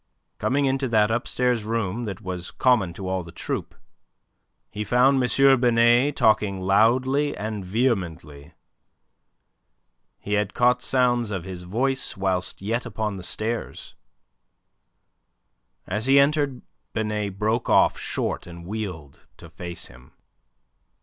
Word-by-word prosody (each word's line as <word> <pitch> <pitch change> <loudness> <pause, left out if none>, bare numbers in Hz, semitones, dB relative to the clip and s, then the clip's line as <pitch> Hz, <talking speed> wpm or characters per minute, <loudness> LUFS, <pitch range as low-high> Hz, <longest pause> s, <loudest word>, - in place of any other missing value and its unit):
Coming 140 +1 +1
into 135 0 0
that 110 -2 +3
upstairs 120 0 0
room 115 0 -2
that 100 -2 -6
was 90 -3 -5
common 120 -9 +2
to 95 +1 -7
all 95 0 -1
the 85 -1 -11
troupe, - - -5 1.0
he 105 - -4
found 125 +4 +3
M. 135 +1 +4
Binet 120 +3 +4
talking 105 -3 +2
loudly 130 +9 +2
and 105 -1 -4
vehemently. 90 - -2 1.6
He 105 - -5
had 105 -1 0
caught 125 0 +3
sounds 120 -3 +1
of 95 -4 -4
his 90 -1 -7
voice 125 +10 -2
whilst 95 -1 -1
yet 115 +4 -1
upon 105 -3 -3
the - - -7
stairs. 110 +6 -4 1.9
As 105 +6 -3
he 135 +1 +6
entered 140 -2 +1 0.3
Binet 105 -3 -2
broke 110 +3 0
off - - +4
short, - - -3
and 85 -1 -10
wheeled 90 -8 -7
to - - -13
face 85 0 -7
him. 60 +1 -15
110 Hz, 125 wpm, -24 LUFS, 95-125 Hz, 1.9 s, he